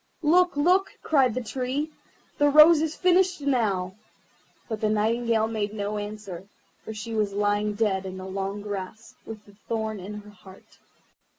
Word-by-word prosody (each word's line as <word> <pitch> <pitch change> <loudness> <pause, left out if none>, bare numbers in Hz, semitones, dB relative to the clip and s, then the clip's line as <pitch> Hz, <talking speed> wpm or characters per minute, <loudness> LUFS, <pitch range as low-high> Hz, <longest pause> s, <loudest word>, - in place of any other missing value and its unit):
"Look, 355 +1 +3
look!" 365 +6 +3
cried 265 -7 +3
the 255 - -2
Tree, 265 +6 -3 0.5
"the 290 0 +5
rose 305 +2 +7
is 320 -1 -2
finished 365 0 +3
now"; 210 -10 0 0.7
but 220 -3 -5
the 215 - +1
Nightingale 220 +1 +1
made 215 -2 -3
no 210 0 -3
answer, 205 -3 -7 0.4
for - - -7
she 220 +1 -6
was 210 -2 0
lying 205 +1 0
dead 195 -3 0
in 185 0 -7
the 185 - -7
long 195 +2 -4
grass, 205 +2 -7
with 215 -2 -9
the 205 - -18
thorn 220 -2 -2
in 200 +3 -7
her 205 0 -15
heart. 190 -2 -17
215 Hz, 165 wpm, -26 LUFS, 205-270 Hz, 0.7 s, rose